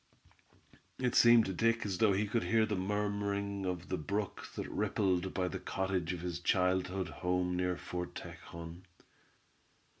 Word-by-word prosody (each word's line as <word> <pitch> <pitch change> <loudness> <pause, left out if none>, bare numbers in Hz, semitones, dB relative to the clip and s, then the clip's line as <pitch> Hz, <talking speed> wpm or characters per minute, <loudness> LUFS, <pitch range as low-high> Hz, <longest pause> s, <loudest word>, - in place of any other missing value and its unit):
It 125 -1 0
seemed 120 -2 +7
to 95 - -2
Dick 115 +4 +2
as 95 -3 -2
though 110 -2 +5
he 100 +3 +1
could 110 +3 0
hear 115 -1 +3
the 110 -1 -1
murmuring 100 0 -1
of 90 -1 -4
the 95 - -1
brook 100 +6 -3
that - - -4
rippled 95 -2 0
by 90 -1 -1
the - - -4
cottage 95 -3 -1
of 90 -2 -4
his 85 -1 -3
childhood 90 +1 +1
home, 90 0 -1
near 90 0 0
Fort 90 0 -5
Tejon. 85 +1 -8
95 Hz, 155 wpm, -33 LUFS, 90-105 Hz, -, seemed